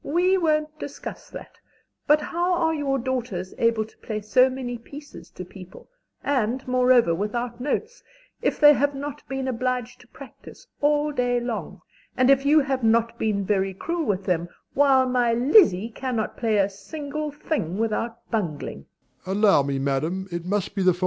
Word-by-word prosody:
We 355 +5 +2
won't 310 -3 0
discuss 285 - -8
that; - - -11 0.5
but 300 +1 +5
how 345 +4 -1
are 325 -2 +1
your 285 -3 0
daughters 240 -8 -3
able 230 -2 +2
to 220 - -21
play 215 -2 -4
so 250 +5 +4
many 250 -2 -5
pieces 290 +5 -12
to 185 - -9
people, 185 0 -13 0.4
and 260 -2 -1
moreover 250 -6 +4
without 235 +6 -3
notes, 440 - -3 0.4
if - - 0
they 295 -1 +8
have 285 +1 0
not 285 +1 -6
been 270 0 -3
obliged 250 -1 -2
to - - -20
practise - - -14 0.2
all 295 +1 +2
day 245 -3 0
long, 240 -2 -5 0.4
and 255 +1 +5
if 275 +1 +3
you 305 +1 +6
have 270 -2 -2
not 230 +1 +2
been 205 -3 0
very 195 -1 0
cruel 335 - -3
with 195 -4 -1
them, 175 -2 -1 0.2
while 270 -2 +4
my 245 -2 +2
Lizzie 235 - +4
cannot 245 -4 -3
play 225 -3 0
a 195 -1 +3
single 295 +9 -6
thing 285 - -3
without 225 +1 -2
bungling? 155 - -3
250 Hz, 150 wpm, -24 LUFS, 220-285 Hz, 0.5 s, they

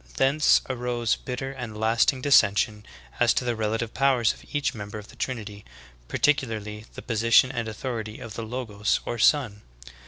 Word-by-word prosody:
Thence 140 +3 +4
arose 120 -2 -1
bitter 135 +1 -5
and 120 -5 -7
lasting 115 +5 +2
dis 145 -2 +7
sension 105 +2 -1 0.4
as 120 -1 +4
to 125 - 0
the 120 -1 0
relative 110 +1 -2
powers 130 -4 +2
of - - -17
each 145 -2 -1
member 105 -2 -7
of 105 0 -10
the - - -14
Trinity, 105 -5 -5 0.4
particularly 110 -7 -1
the - - -8
position 115 +2 +3
and 120 -3 -3
authority 110 -1 -5
of 115 -4 -9
the 115 - -5
Logos 110 -3 -2
or 120 - -4
Son. 115 -6 +3
115 Hz, 165 wpm, -25 LUFS, 110-130 Hz, 0.4 s, dis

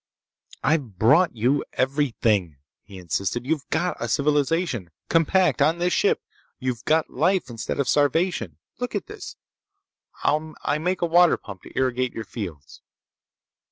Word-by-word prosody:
"I've 135 - 0
brought 145 - +4
you 125 +6 +1
everything!" 115 - +1 0.2
he 100 - -13
insisted. 95 +7 -2
"You've 150 -1 -2
got 175 +3 0
a - - -3
civilization, 145 - +1 0.2
compact, 165 -2 +3
on 155 +4 +4
this 175 +1 +1
ship! 430 +3 +2 0.3
You've 125 -3 -3
got 160 0 +2
life 170 +1 +1
instead 115 +3 -4
of 140 - +1
starvation! 145 - +1 0.2
Look - - -3
at - - -2
this. - - -9 0.9
I 155 0 0
make 180 +3 -1
a - - +5
water 175 +1 +5
pump 100 -3 -10
to - - -13
irrigate 130 -1 0
your 115 - -5
fields!" 85 - -8
140 Hz, 140 wpm, -24 LUFS, 115-165 Hz, 0.9 s, a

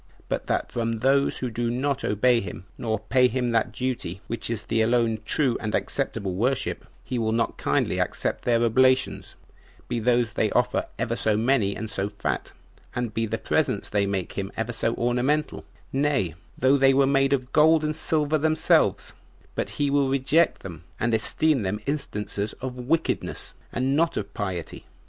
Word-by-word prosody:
But - - -2
that - - -1
from 115 -1 -2
those 140 +2 +3
who 125 -2 -3
do 120 +1 -1
not 135 +3 -1
obey 120 +4 +3
him, 90 -1 -8
nor 110 -3 -1
pay 125 +3 +3
him 125 0 -1
that 115 -1 +1
duty 125 -8 -3
which 115 -1 -3
is 115 -2 -2
the 115 0 0
alone 115 -1 +2
true 135 -6 +1
and 105 -1 -2
acceptable 95 -2 -2
worship, 125 +8 -1 0.2
he 125 - -3
will 110 -1 0
not 115 0 0
kindly - - 0
accept - - -2
their 120 -1 +2
oblations, 130 +3 +2 0.5
be 120 -1 -1
those 120 0 +2
they - - +1
offer - - +1
ever - - -1
so 110 -1 +3
many 110 -4 +2
and 110 - -5
so 100 -1 -1
fat, 105 - -3 0.4
and 120 -3 -2
be 115 0 -1
the 110 +2 -2
presents - - 0
they 100 -1 +1
make 95 -2 -2
him 95 0 -4
ever 115 +2 -2
so 115 0 0
ornamental, 125 +6 0 0.3
nay, 135 - +1 0.2
though 130 +2 +4
they 135 0 +5
were 135 0 +5
made 135 0 +2
of 130 -2 -1
gold 155 +1 +5
and 155 0 -1
silver 155 -1 +1
themselves, 155 +1 +2 0.4
but - - -2
he 145 -1 +1
will 140 -1 +2
reject 140 +5 +2
them, 85 -3 -8 0.2
and 115 +1 0
esteem 135 +5 +2
them 100 +1 -2
instances 105 -8 -3
of 130 -1 -7
wickedness, 145 +7 -1 0.2
and 130 +2 0
not 165 +2 +1
of - - -4
piety. 95 -6 -4
120 Hz, 175 wpm, -25 LUFS, 110-135 Hz, 0.5 s, they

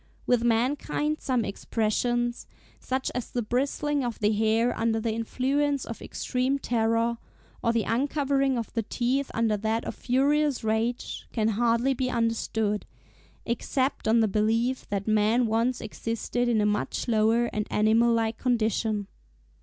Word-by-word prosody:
With 245 -2 +2
mankind 270 +6 0
some 250 -5 0
expressions, 240 +4 -1 0.3
such 260 0 -2
as 250 -2 -4
the 245 - -2
bristling 275 +4 0
of 240 -2 -3
the 210 0 +2
hair 220 +3 +2
under 225 0 0
the 220 0 -1
influence 270 +5 0
of 230 - -7
extreme 255 +2 -1
terror, 230 -2 0 0.4
or 230 - +3
the 230 -2 +1
uncovering 275 +2 +1
of 230 - -4
the 230 - 0
teeth 250 +5 -1
under 225 -2 +2
that 220 +2 -1
of - - -3
furious 280 +2 +1
rage, 220 +2 -2
can 220 -2 +1
hardly 235 +4 +2
be 255 0 -1
understood, 225 -3 -1 0.6
except 260 +3 -1
on 225 +1 +4
the 220 - +3
belief 225 +5 0
that 200 0 -2
man 215 +3 +3
once 230 +3 +1
existed 230 +2 -2
in 225 -3 +2
a - - +2
much 210 +4 -1
lower 225 +1 +3
and 210 0 -2
animal 225 +3 +3
like 225 -1 0
condition. 220 -3 0
230 Hz, 145 wpm, -27 LUFS, 220-255 Hz, 0.6 s, on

